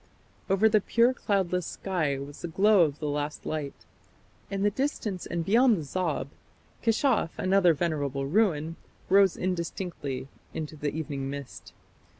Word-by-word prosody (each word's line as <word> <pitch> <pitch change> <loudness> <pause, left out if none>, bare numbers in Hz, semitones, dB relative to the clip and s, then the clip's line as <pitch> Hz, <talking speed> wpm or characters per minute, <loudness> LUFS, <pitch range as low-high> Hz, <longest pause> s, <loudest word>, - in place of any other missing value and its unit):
Over 195 +3 +4
the 215 -1 +4
pure 235 +5 +3
cloudless 185 -7 0
sky 160 -8 -1
was 140 +2 -8
the - - -3
glow 200 +4 +4
of 145 -2 -4
the 150 - -4
last 145 +1 -3
light. 150 -3 -4 0.6
In 195 0 -2
the 205 - +3
distance 215 - -2
and 170 -1 -2
beyond 230 +3 +5
the 160 - -4
Zab, 160 -2 -2 0.5
Keshaf, 225 - +1
another 185 -3 +4
venerable 145 -4 -1
ruin, 165 -2 +1 0.3
rose 195 -1 +5
indistinctly 170 -6 -3 0.3
into 155 -1 -4
the 150 0 -2
evening 145 -3 -4
mist. 140 -1 -8
170 Hz, 145 wpm, -28 LUFS, 150-195 Hz, 0.6 s, beyond